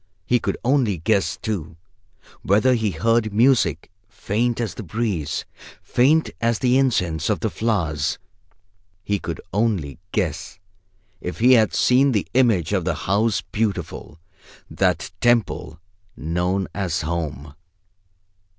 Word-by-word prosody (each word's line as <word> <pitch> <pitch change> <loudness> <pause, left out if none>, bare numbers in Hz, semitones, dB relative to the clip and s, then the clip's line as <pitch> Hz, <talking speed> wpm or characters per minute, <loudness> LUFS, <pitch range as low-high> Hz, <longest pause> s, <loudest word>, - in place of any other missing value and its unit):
He 125 - +2
could - - -2
only 125 -7 +2
guess, 100 +4 0
too, 90 -6 -4 0.6
whether 110 +7 +3
he 110 -3 +1
heard 110 +6 +1
music, 105 - +2 0.2
faint 115 +3 -1
as 115 -3 -2
the - - -7
breeze, 105 -6 -2 0.4
faint 150 +6 +2
as 115 -1 +2
the 125 0 +2
incense 90 - 0
of - - 0
the - - -1
flowers. 85 -10 -1 0.9
He 100 +1 -1
could - - -5
only 95 - -1
guess 90 -1 -2 0.6
if 90 - -5
he 125 +3 +5
had 110 -4 +4
seen 130 +2 +4
the 105 - 0
image 115 - +2
of - - +1
the - - -1
House 105 +3 +1
Beautiful, 105 -6 -4 0.5
that - - 0
temple 120 -9 +1 0.4
known 90 +5 -1
as 95 -5 -2
Home. 75 -3 -4
105 Hz, 125 wpm, -22 LUFS, 85-115 Hz, 0.9 s, he